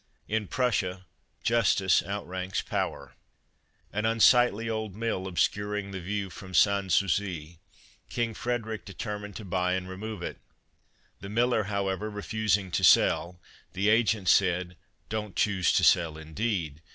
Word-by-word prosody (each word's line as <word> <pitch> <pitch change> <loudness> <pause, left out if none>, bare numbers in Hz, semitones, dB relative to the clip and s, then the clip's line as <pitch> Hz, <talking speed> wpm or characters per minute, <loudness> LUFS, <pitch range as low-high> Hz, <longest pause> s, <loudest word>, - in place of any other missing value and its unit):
— - - -42
In 105 -2 -4
Prussia 95 -7 -1 0.4
Justice 100 -5 +3
outranks 95 -1 -4
Power: - - -3 0.8
An 105 +1 -1
unsightly 115 0 +4
old 110 -3 -3
mill 110 -4 -2
obscuring 105 +2 -1
the 95 -1 -5
view 100 +1 -3
from 95 0 -9
Sans 100 +1 +3
Souci, 85 -4 -1 0.5
King 115 -1 -1
Frederic 110 -3 -3
determined 105 +2 -6
to 110 - -7
buy 90 0 0
and 95 0 -2
remove 95 +1 -6
it. - - -5 0.8
The 95 - -8
miller, 115 0 +1
however, 100 0 -2
refusing 105 -2 -1
to - - -1
sell, 90 +1 +4 0.3
the 100 +3 +1
agent 110 -3 +2
said: 90 -1 +3 0.3
"Don't 105 -2 -4
choose 95 -4 +2
to - - +3
sell, 80 -3 +4
indeed! 80 -2 -3
100 Hz, 135 wpm, -28 LUFS, 90-110 Hz, 0.8 s, unsightly